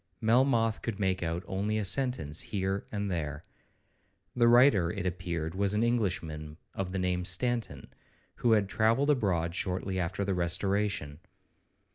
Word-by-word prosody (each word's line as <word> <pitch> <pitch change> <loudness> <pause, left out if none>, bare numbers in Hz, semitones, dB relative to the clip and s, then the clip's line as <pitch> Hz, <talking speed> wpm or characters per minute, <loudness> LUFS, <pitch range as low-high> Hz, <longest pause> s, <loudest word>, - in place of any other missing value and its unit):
—Melmoth 115 0 +2
could 115 -3 -4
make 95 -1 0
out 85 +1 -2
only 100 +3 -2
a 105 - -1
sentence 95 - 0
here 95 -1 -3
and 100 -2 -2
there. 75 -3 -3 0.9
The 120 -1 +4
writer, 120 -7 +5
it 90 +1 -4
appeared, 85 -3 -3
was 100 +1 0
an 110 - +2
Englishman 85 -10 -2 0.2
of 95 -2 -4
the 95 - -3
name 90 -1 0
of 90 - -2
Stanton, 120 +5 -1 0.4
who 120 -2 +3
had 105 -3 +3
travelled 115 +8 +2
abroad 90 - 0
shortly 95 +1 -2
after 90 +3 -2
the 100 - 0
Restoration. 90 -3 -1
95 Hz, 150 wpm, -30 LUFS, 90-110 Hz, 0.9 s, writer